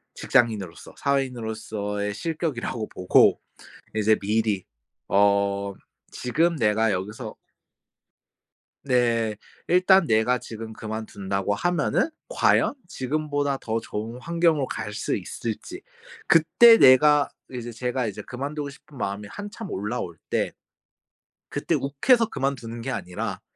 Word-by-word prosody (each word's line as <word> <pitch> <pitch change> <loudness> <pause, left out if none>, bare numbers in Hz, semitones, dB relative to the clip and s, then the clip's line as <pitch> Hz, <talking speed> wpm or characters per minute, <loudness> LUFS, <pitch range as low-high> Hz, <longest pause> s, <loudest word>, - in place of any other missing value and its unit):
직장인으로서, 105 - 0
사회인으로서의 110 -6 -2
실격이라고 150 -8 -3
보고 90 0 +4 0.6
이제 110 0 +3
미리 105 -1 0 0.4
어 100 0 +2 0.4
지금 165 +7 +1
내가 110 -1 +2
여기서 105 +5 -4 1.5
네. 115 -4 +1 0.3
일단 185 +1 +5
내가 110 +3 +2
지금 115 -1 -8
그만둔다고 100 -3 -3
하면은 175 - +1 0.2
과연 - - +2
지금보다 145 0 -1
더 115 -2 -2
좋은 110 +2 -6
환경으로 165 -2 +1
갈 105 -2 -5
수 115 - -1
있을지. 115 - -6 0.5
그때 225 +8 +7
내가 145 - +6 0.2
이제 120 -2 -6
제가 125 +1 -2
이제 100 - -5
그만두고 140 +3 -5
싶은 140 0 -15
마음이 100 0 -3
한참 205 +2 -7
올라올 100 -4 -4
때 - - 0 1.0
그때 - - -1
욱해서 225 - +2
그만두는 120 -4 -3
게 130 +2 -3
아니라 95 +2 -4
115 Hz, 260 characters per minute, -25 LUFS, 105-145 Hz, 1.5 s, 그때